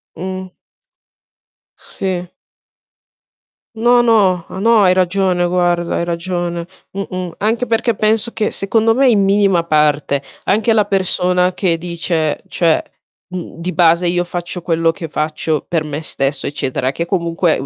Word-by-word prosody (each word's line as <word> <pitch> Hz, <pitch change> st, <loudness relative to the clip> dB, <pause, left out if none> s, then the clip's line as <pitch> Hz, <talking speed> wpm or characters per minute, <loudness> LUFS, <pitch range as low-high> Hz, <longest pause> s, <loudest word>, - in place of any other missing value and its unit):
Mh. 185 Hz, 0 st, -6 dB, 1.2 s
Sì. 180 Hz, -2 st, -4 dB, 1.5 s
No, 240 Hz, +2 st, +4 dB
no. 200 Hz, -7 st, +3 dB
Ah, 190 Hz, -, -7 dB
no, 230 Hz, 0 st, +5 dB
hai 185 Hz, -, +5 dB
ragione, 185 Hz, -1 st, +1 dB
guarda. 175 Hz, -1 st, 0 dB
Hai 170 Hz, -, -1 dB
ragione. 175 Hz, 0 st, -3 dB, 0.3 s
Mh-mh. 185 Hz, -3 st, -5 dB
Anche 225 Hz, +4 st, 0 dB
perché 230 Hz, 0 st, +1 dB
penso 220 Hz, +2 st, +1 dB
che, 220 Hz, -2 st, -1 dB
secondo 225 Hz, +3 st, +1 dB
me, 265 Hz, +1 st, +4 dB
in 215 Hz, -4 st, +4 dB
minima 195 Hz, -4 st, +3 dB
parte, 150 Hz, -3 st, +2 dB, 0.2 s
anche 220 Hz, +4 st, +2 dB
la 215 Hz, -2 st, +3 dB
persona 180 Hz, -2 st, +1 dB
che 170 Hz, -4 st, 0 dB
dice: 165 Hz, -2 st, -2 dB
"Cioè, 165 Hz, -2 st, +2 dB, 0.5 s
mhmm, 175 Hz, -2 st, -7 dB
di 180 Hz, +2 st, -3 dB
base 170 Hz, 0 st, +3 dB
io 175 Hz, 0 st, +1 dB
faccio 175 Hz, 0 st, -5 dB
quello 165 Hz, -1 st, +1 dB
che 165 Hz, 0 st, -7 dB
faccio 155 Hz, 0 st, -2 dB
per 165 Hz, -3 st, 0 dB
me 150 Hz, 0 st, -5 dB
stesso", 135 Hz, -3 st, -2 dB
eccetera, 130 Hz, -2 st, -2 dB
che 170 Hz, -, -2 dB
comunque 170 Hz, -2 st, 0 dB
u 135 Hz, -, -5 dB
180 Hz, 145 wpm, -17 LUFS, 165-195 Hz, 1.5 s, no